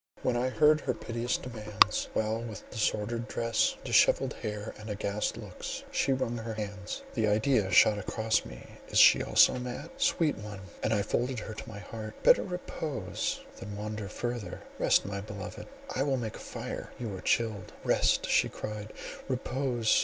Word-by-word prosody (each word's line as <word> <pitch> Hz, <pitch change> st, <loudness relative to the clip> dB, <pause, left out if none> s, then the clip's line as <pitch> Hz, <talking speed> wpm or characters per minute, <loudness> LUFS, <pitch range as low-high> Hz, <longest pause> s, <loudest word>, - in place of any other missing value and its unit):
When 125 Hz, -, +2 dB
I 125 Hz, +2 st, +1 dB
heard 150 Hz, +3 st, +4 dB
her -, -, -1 dB
piteous 120 Hz, +1 st, -2 dB
demands, 110 Hz, -3 st, +2 dB
while 110 Hz, +1 st, 0 dB
with 115 Hz, -3 st, -7 dB
disordered 110 Hz, +2 st, -1 dB
dress, 115 Hz, -1 st, +1 dB
dishevelled -, -, +4 dB
hair, 105 Hz, 0 st, -4 dB
and 105 Hz, +1 st, -8 dB
aghast 105 Hz, 0 st, -2 dB
looks, -, -, -6 dB
she -, -, +1 dB
wrung 130 Hz, -3 st, 0 dB
her 110 Hz, -1 st, -5 dB
hands—the 105 Hz, +1 st, -3 dB
idea 110 Hz, 0 st, +3 dB
shot 105 Hz, +3 st, +6 dB
across 110 Hz, +2 st, 0 dB
me -, -, -10 dB, 0.2 s
is -, -, -2 dB
she -, -, +8 dB
also -, -, +5 dB
mad?—"Sweet 155 Hz, -, 0 dB
one," 105 Hz, -1 st, -7 dB, 0.2 s
and 110 Hz, -, 0 dB
I 105 Hz, -2 st, +2 dB
folded 125 Hz, +5 st, -1 dB
her 110 Hz, -, -6 dB
to 105 Hz, -, -8 dB
my 105 Hz, -, -8 dB
heart, 110 Hz, +2 st, -7 dB
"better -, -, +7 dB
repose 155 Hz, -, -3 dB, 0.2 s
than 100 Hz, +1 st, -7 dB
wander 105 Hz, 0 st, -4 dB
further;—rest—my 100 Hz, -3 st, -1 dB
beloved, 105 Hz, -1 st, -7 dB, 0.3 s
I 130 Hz, -, 0 dB
will 135 Hz, -1 st, +2 dB
make 115 Hz, -3 st, -4 dB
a -, -, -9 dB
fire—you 110 Hz, -5 st, -6 dB
are 95 Hz, -, -7 dB
chill." 110 Hz, -4 st, +1 dB, 0.2 s
"Rest!" -, -, +3 dB
she -, -, +3 dB
cried, 105 Hz, 0 st, -6 dB, 0.3 s
"repose! 130 Hz, -3 st, +1 dB
110 Hz, 155 wpm, -30 LUFS, 105-125 Hz, 0.3 s, she